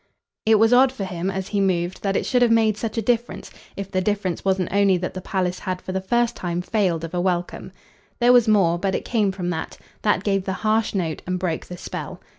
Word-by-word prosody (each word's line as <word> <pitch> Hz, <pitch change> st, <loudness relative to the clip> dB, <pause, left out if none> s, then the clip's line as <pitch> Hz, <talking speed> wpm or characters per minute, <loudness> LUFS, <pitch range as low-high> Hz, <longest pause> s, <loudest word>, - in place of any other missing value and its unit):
It 220 Hz, -1 st, +6 dB
was 225 Hz, +3 st, +4 dB
odd 255 Hz, +1 st, +6 dB
for 235 Hz, -7 st, -5 dB
him, 185 Hz, -1 st, -3 dB
as 190 Hz, -1 st, -4 dB
he 205 Hz, -2 st, 0 dB
moved, 180 Hz, -2 st, 0 dB
that 195 Hz, -1 st, -1 dB
it -, -, 0 dB
should 250 Hz, -1 st, +1 dB
have 240 Hz, -, +5 dB
made 225 Hz, -2 st, +3 dB
such 220 Hz, +2 st, -4 dB
a 225 Hz, -, 0 dB
difference 240 Hz, +2 st, -1 dB, 0.3 s
if 200 Hz, -1 st, -6 dB
the 185 Hz, -1 st, 0 dB
difference 195 Hz, -2 st, -1 dB
wasn't 190 Hz, -2 st, 0 dB
only 200 Hz, -2 st, +4 dB
that 180 Hz, +1 st, -4 dB
the 185 Hz, -, -6 dB
palace 180 Hz, -1 st, -2 dB
had 185 Hz, -2 st, -3 dB
for 185 Hz, -, -7 dB
the 190 Hz, 0 st, -2 dB
first 235 Hz, +4 st, +1 dB
time 175 Hz, 0 st, -3 dB
failed 180 Hz, -5 st, 0 dB
of 165 Hz, -, -6 dB
a 175 Hz, -, 0 dB
welcome. 180 Hz, -1 st, -2 dB, 0.5 s
There 245 Hz, 0 st, +5 dB
was 245 Hz, -2 st, +5 dB
more, 185 Hz, -6 st, +3 dB
but 190 Hz, 0 st, 0 dB
it -, -, -3 dB
came 215 Hz, -5 st, +1 dB
from 180 Hz, -2 st, -3 dB
that; 160 Hz, -2 st, -5 dB, 0.2 s
that 205 Hz, -3 st, +1 dB
gave 195 Hz, -2 st, 0 dB
the 190 Hz, -, -1 dB
harsh 220 Hz, 0 st, +1 dB
note 165 Hz, -5 st, -2 dB
and 180 Hz, 0 st, -1 dB
broke 175 Hz, -3 st, -3 dB
the 180 Hz, -, -8 dB
spell. -, -, -6 dB
195 Hz, 240 wpm, -23 LUFS, 180-215 Hz, 0.5 s, It